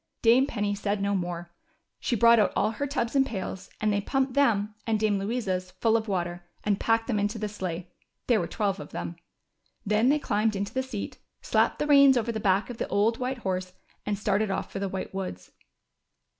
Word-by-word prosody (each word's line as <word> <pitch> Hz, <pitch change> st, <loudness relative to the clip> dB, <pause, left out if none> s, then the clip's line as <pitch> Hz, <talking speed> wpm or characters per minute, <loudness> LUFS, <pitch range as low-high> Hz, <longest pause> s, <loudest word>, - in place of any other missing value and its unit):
Dame 240 Hz, +4 st, +5 dB
Penny 205 Hz, -5 st, -1 dB
said 200 Hz, 0 st, -1 dB
no 200 Hz, 0 st, 0 dB
more. 175 Hz, -2 st, -3 dB, 0.5 s
She 240 Hz, -, 0 dB
brought 235 Hz, +1 st, +6 dB
out 205 Hz, -, +3 dB
all 215 Hz, -, +2 dB
her 285 Hz, +5 st, -3 dB
tubs 265 Hz, -3 st, -2 dB
and 270 Hz, -, +6 dB
pails, 195 Hz, -5 st, -5 dB
and 215 Hz, -1 st, +1 dB
they 205 Hz, -, +1 dB
pumped 265 Hz, +4 st, 0 dB
them, 220 Hz, -7 st, +2 dB
and 220 Hz, -1 st, +1 dB
Dame 210 Hz, -2 st, +2 dB
Louisa's, 195 Hz, -4 st, -2 dB
full 225 Hz, -1 st, +3 dB
of 225 Hz, 0 st, 0 dB
water, 175 Hz, -3 st, -2 dB, 0.2 s
and 205 Hz, -1 st, +1 dB
packed 225 Hz, 0 st, +2 dB
them 225 Hz, -5 st, 0 dB
into 205 Hz, +3 st, -1 dB
the 215 Hz, 0 st, -2 dB
sleigh 185 Hz, -4 st, -5 dB, 0.2 s
— -, -, -53 dB
there 235 Hz, -4 st, +3 dB
were -, -, -2 dB
twelve 200 Hz, -3 st, -1 dB
of -, -, -8 dB
them. 85 Hz, 0 st, -4 dB, 0.7 s
Then 215 Hz, +4 st, +3 dB
they 295 Hz, -, +4 dB
climbed 215 Hz, -6 st, 0 dB
into 200 Hz, +2 st, -3 dB
the 260 Hz, -, +1 dB
seat, 260 Hz, -6 st, -6 dB, 0.2 s
slapped -, -, +2 dB
the -, -, -1 dB
reins 280 Hz, -3 st, +7 dB
over 235 Hz, 0 st, 0 dB
the 220 Hz, -, -3 dB
back 200 Hz, +3 st, +1 dB
of 235 Hz, -, -8 dB
the -, -, -1 dB
old 220 Hz, +3 st, +1 dB
white 255 Hz, +1 st, -2 dB
horse, 185 Hz, -1 st, -2 dB, 0.3 s
and 210 Hz, -1 st, -1 dB
started 205 Hz, +1 st, +1 dB
off 195 Hz, -, -3 dB
for -, -, -4 dB
the 200 Hz, 0 st, -2 dB
White 190 Hz, 0 st, -5 dB
Woods. 135 Hz, -, -5 dB
210 Hz, 215 wpm, -27 LUFS, 195-235 Hz, 0.7 s, reins